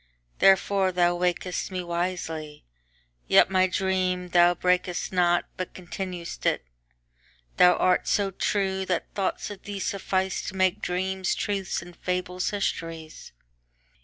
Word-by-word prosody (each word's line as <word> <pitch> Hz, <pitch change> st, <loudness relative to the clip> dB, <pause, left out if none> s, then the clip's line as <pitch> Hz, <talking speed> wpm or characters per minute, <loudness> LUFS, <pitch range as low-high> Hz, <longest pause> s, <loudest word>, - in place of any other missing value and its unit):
Therefore 195 Hz, 0 st, +4 dB
thou 175 Hz, -1 st, +2 dB
waked'st 180 Hz, 0 st, -1 dB
me 185 Hz, -1 st, -4 dB
wisely; 170 Hz, -3 st, -4 dB, 0.6 s
yetMy 185 Hz, -1 st, +5 dB
dream 185 Hz, -1 st, 0 dB
thou 175 Hz, 0 st, +5 dB
brak'st 180 Hz, +1 st, 0 dB
not, 175 Hz, -1 st, +3 dB
but 185 Hz, -, -5 dB
continued'st 180 Hz, -1 st, -6 dB
it:Thou -, -, -1 dB
art 180 Hz, 0 st, +2 dB
so 200 Hz, -1 st, +1 dB
true 190 Hz, 0 st, 0 dB
that 180 Hz, -, -2 dB
thoughts 195 Hz, +1 st, -2 dB
of 200 Hz, -, -9 dB
thee 205 Hz, -1 st, -6 dB
sufficeTo 190 Hz, -1 st, -2 dB
make 185 Hz, 0 st, +1 dB
dreams 190 Hz, +1 st, -1 dB
truths 195 Hz, -4 st, -2 dB
and 175 Hz, 0 st, -13 dB
fables 180 Hz, 0 st, -2 dB
histories. 165 Hz, -, -4 dB
180 Hz, 115 wpm, -26 LUFS, 175-190 Hz, 0.6 s, yetMy